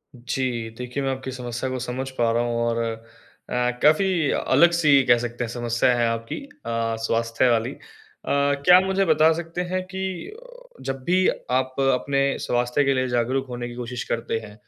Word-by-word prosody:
जी। 120 -1 -3
देखिए, 125 +3 -4
मैं 135 - 0
आपकी 130 0 -5
समस्या 125 0 -4
को 130 0 -3
समझ 125 +2 -4
पा 115 -1 +2
रहा 120 +1 +1
हूँ 120 -1 -1
और 115 0 0 0.7
अ, - - -5 0.3
काफ़ी 155 +6 +5 0.3
अलग-सी 150 -1 +4
कह 120 -1 +5
सकते 120 0 -4
हैं 115 - -4
समस्या 120 0 0
है 120 - +2
आपकी 115 0 -4 0.3
अ, 115 -1 -1
स्वास्थ्य 115 +2 +1
वाली। 115 +2 +1
अ, - - -11 0.5
क्या 140 +4 +4
आप 185 - +3
मुझे 190 +1 +1
बता 160 0 +4
सकते 170 +1 -4
हैं 185 0 0
कि 190 0 -4 0.3
अ, - - -15
जब 135 -1 -4
भी 185 +5 +3 0.3
आप 130 0 -2 0.2
अपने 140 +2 0 0.2
स्वास्थ्य 120 +3 +1
के 135 - +3
लिए 130 0 0
जागरूक 125 +2 0
होने 120 -1 -5
की 120 - -9
कोशिश 125 0 -5
करते 115 -1 -1
हैं, 105 -2 -11
130 Hz, 185 wpm, -23 LUFS, 120-145 Hz, 0.7 s, काफ़ी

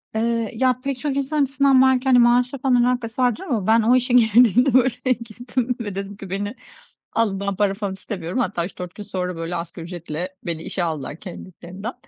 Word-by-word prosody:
Eee, 230 0 0
ya, 255 +1 +1
pek 275 -2 -3
çok 285 0 -2
insan 280 +2 0
açısından 275 -1 +3
belki, 260 -1 +4
hani, 255 -2 +5
maaşla 245 +2 +3
falan 250 -2 +3
alakası 245 -1 -1
vardır 245 - +1
ama 235 - -2
ben 225 +1 +5
o 235 +3 +4
işe 250 0 +1
girdiğimde, 245 +2 +5
böyle, 255 0 +2
girdim 245 +2 -3
ve 205 -4 -5
dedim 195 +1 -5
ki 195 -2 -9
beni 205 +4 -3 0.6
alın, 210 -4 +1
ben 200 0 -2
para 205 0 +1
falan 200 -1 -4
istemiyorum. 190 0 -5
Hatta 190 -8 -1
3-4 180 -1 -8
gün 210 - -7
sonra, 180 -2 -4
böyle, 165 +1 -4
asgari 170 0 -6
ücretle 175 +1 -6
beni 165 -2 -4
işe 180 - -2
aldılar 150 -4 -3
kendiliklerinden. 185 +4 -8
225 Hz, 195 wpm, -22 LUFS, 185-250 Hz, 0.6 s, hani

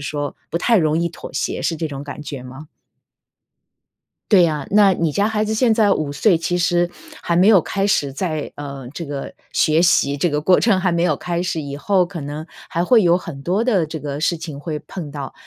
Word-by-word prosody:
说 145 0 -4 0.2
不 170 - -1
太 230 +5 +3
容 155 -4 +2
易 170 0 0
妥 170 - -10
协， - - -2
是 165 - -1
这 160 +1 -2
种 140 -2 -6
感 145 0 -8
觉 145 -3 -7
吗？ 130 +4 -10 1.7
对 185 -4 +7
呀， 150 -4 0
那 205 -2 +5
你 165 -3 0
家 205 +6 +1
孩 215 -1 0
子 215 +1 -1
现 230 0 +3
在 215 -2 +3
5 155 -5 0
岁， 175 +3 +3
其 175 +2 -1
实 175 0 +1 0.3
还 170 - -1
没 185 +5 +5
有 200 -5 +7
开 195 +4 -2
始 145 -9 +1
在， 155 -1 -3
呃， 140 -3 -7
这 170 - -5
个 140 -1 -6 0.2
学 155 +2 +3
习 140 -5 +3
这 170 +5 0
个 150 -1 0
过 180 +4 +4
程 210 -5 +3
还 185 0 +1
没 170 0 +1
有 155 -5 +1
开 175 0 -2
始， 170 -3 -2
以 140 -1 -6
后 185 +4 +2
可 170 -3 -7
能 150 +3 -6 0.2
还 170 - -1
会 225 +1 +5
有 175 0 +4
很 145 -6 -8
多 185 +7 0
的 210 -9 +2
这 155 0 -6
个 145 0 -5
事 170 0 +1
情 155 -3 -7
会 155 -2 -4
碰 155 -2 -8
到， 140 -2 -6
170 Hz, 240 characters per minute, -20 LUFS, 145-185 Hz, 1.7 s, 对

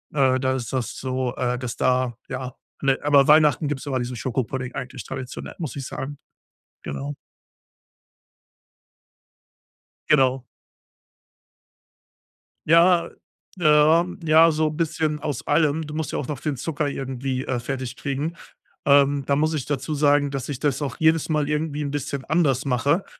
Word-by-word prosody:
Äh, 130 -2 +3
da 130 0 +1
ist 120 -4 -4
das 120 -3 -2
so, 130 -1 -2
äh, 125 -1 0
dass 125 -2 -4
da 125 -2 +1
ja, 130 -1 -5 0.3
ne, 135 -1 +2
aber 140 -2 +5
Weihnachten 150 -1 +5
gibt's 145 -1 -4
immer 135 - 0
diesen 125 0 -4
Schokopudding 130 +1 -3
eigentlich 130 0 -6
traditionell, 130 0 -7
muss 155 -8 -4
ich 135 - -5
sagen, 145 +1 -6 0.7
genau. 145 +1 -5 3.0
Genau. 130 -3 +3 2.3
Ja, 170 +1 +5 0.5
äh, - - -4
ja, 155 +2 +5 0.2
ja 160 +1 +6
so 155 0 +1
bisschen 155 -1 -1
aus 145 -4 -4
allem. 155 -1 +2
Du 150 - -7
musst 155 0 -3
ja - - -2
auch 130 - -4
noch 145 -4 -5
den 150 -3 -2
Zucker 150 +2 -2
irgendwie, 135 -1 -3
äh, 125 -2 -2
fertig 130 0 -4
kriegen. 145 +4 -3 0.5
Ähm, 140 0 +4
da 140 +1 +1
muss 155 +1 +1
ich 150 -4 -2
dazu 145 +1 -3
sagen, 145 -1 +3
dass 135 -1 -4
ich 140 -3 -4
das 145 -1 0
auch 135 -4 -3
jedes 160 0 +3
Mal 150 -2 +1
irgendwie 150 0 -1
'n 140 - -3
bisschen 140 -1 -4
anders 145 -6 +1
mache, 140 +8 +1
140 Hz, 155 wpm, -23 LUFS, 130-150 Hz, 3.0 s, ja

